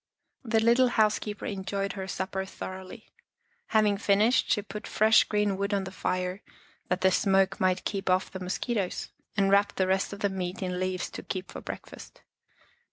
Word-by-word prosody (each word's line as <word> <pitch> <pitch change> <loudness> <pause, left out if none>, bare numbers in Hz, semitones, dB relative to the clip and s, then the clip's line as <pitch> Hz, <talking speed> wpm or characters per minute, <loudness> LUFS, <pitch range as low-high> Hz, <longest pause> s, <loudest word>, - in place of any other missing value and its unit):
The 225 -2 +2
little 235 +3 +5
housekeeper 215 -2 +1
enjoyed 195 0 -3
her 190 -2 -5
supper 190 +1 -3
thoroughly. 190 +3 -9 0.6
Having 215 -2 +3
finished, 210 +4 +3
she 205 - +2
put 210 +1 -7
fresh 220 +1 +5
green 210 -2 0
wood 200 +1 0
on 195 - 0
the 190 - -6
fire 185 0 -2 0.5
that 180 +1 0
the 190 - +4
smoke 190 0 +2
might 185 0 +1
keep 195 -2 -2
off 185 +1 +2
the 190 - -6
mosquitos, 190 +2 -2 0.3
and 195 -1 +3
wrapped 200 0 +3
the 190 - +2
rest 190 +1 +1
of 200 +1 -8
the 200 - +2
meat 185 0 -4
in 180 -1 -2
leaves 185 -1 -2
to - - -6
keep 185 -1 -5
for - - -7
breakfast. - - -9
195 Hz, 175 wpm, -28 LUFS, 185-210 Hz, 0.6 s, little